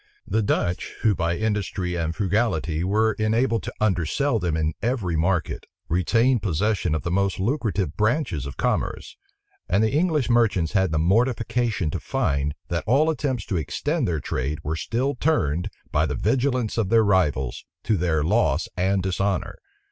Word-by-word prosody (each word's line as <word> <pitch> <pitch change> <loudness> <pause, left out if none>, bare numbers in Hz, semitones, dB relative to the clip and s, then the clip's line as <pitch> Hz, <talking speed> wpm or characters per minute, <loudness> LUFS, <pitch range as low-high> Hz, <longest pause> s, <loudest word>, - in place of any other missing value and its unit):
The 110 - 0
Dutch, 90 -3 -1
who 110 -3 +4
by 85 -1 -1
industry 100 -4 -1
and 85 -1 -2
frugality 90 -5 0
were 110 +4 +2
enabled 115 +2 +1
to - - -6
undersell 110 - +1
them 85 -4 -1
in 80 0 0
every 110 -8 -1
market, 85 0 -1 0.2
retained 115 +8 +2
possession 95 -2 0
of 80 - -3
the 85 - -2
most 100 +1 0
lucrative 100 - -1
branches 110 - 0
of 70 - -8
commerce; - - -2 0.5
and 95 +4 +3
the 110 - +2
English 155 -2 +1
merchants 110 -9 +2
had 95 -4 +2
the 80 - 0
mortification 115 - +1
to - - -3
find, 70 +1 -1
that 85 -2 -1
all 145 +7 +4
attempts 135 -8 -2
to 95 - -2
extend 145 - -1
their 80 -3 -1
trade 70 +2 -2
were 80 +2 -2
still 125 - -1
turned, 105 - 0 0.2
by 75 +2 +2
the 75 - -2
vigilance 125 - 0
of 105 -4 0
their 115 0 +5
rivals, 75 - +1 0.2
to 110 - +1
their 85 -4 +1
loss 85 -4 +2
and 95 +1 +1
dishonor. 95 0 -1
100 Hz, 165 wpm, -24 LUFS, 85-115 Hz, 0.5 s, their